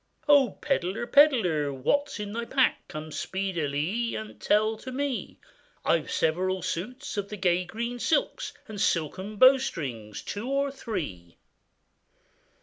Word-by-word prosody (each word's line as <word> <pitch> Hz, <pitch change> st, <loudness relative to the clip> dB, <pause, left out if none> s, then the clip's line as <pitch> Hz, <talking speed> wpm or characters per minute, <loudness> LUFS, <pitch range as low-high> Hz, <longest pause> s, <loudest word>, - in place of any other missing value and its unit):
'Oh! 285 Hz, -3 st, +5 dB
pedlar, 200 Hz, -6 st, -1 dB
pedlar, 220 Hz, -, +4 dB
what 285 Hz, -, +1 dB
is -, -, -7 dB
in 205 Hz, 0 st, -5 dB
thy 235 Hz, +1 st, -2 dB
pack, 265 Hz, +1 st, +1 dB
Come 155 Hz, +1 st, -7 dB
speedilie 185 Hz, +4 st, -2 dB
and 215 Hz, 0 st, -7 dB
tell 215 Hz, +1 st, +3 dB
to 260 Hz, +4 st, -8 dB
me?' 275 Hz, -1 st, -3 dB, 0.5 s
'I've 165 Hz, -2 st, +2 dB
several 185 Hz, +3 st, 0 dB
suits 210 Hz, +9 st, -4 dB
of 200 Hz, 0 st, -2 dB
the 210 Hz, -, -6 dB
gay 180 Hz, -1 st, +2 dB
green 235 Hz, +6 st, -4 dB
silks, 295 Hz, +4 st, 0 dB, 0.2 s
And 210 Hz, -3 st, -5 dB
silken 185 Hz, +3 st, 0 dB
bowstrings 155 Hz, -, +2 dB
two 215 Hz, +5 st, -4 dB
or 275 Hz, 0 st, +1 dB
three. 145 Hz, -, -6 dB
205 Hz, 135 wpm, -27 LUFS, 165-250 Hz, 0.5 s, Oh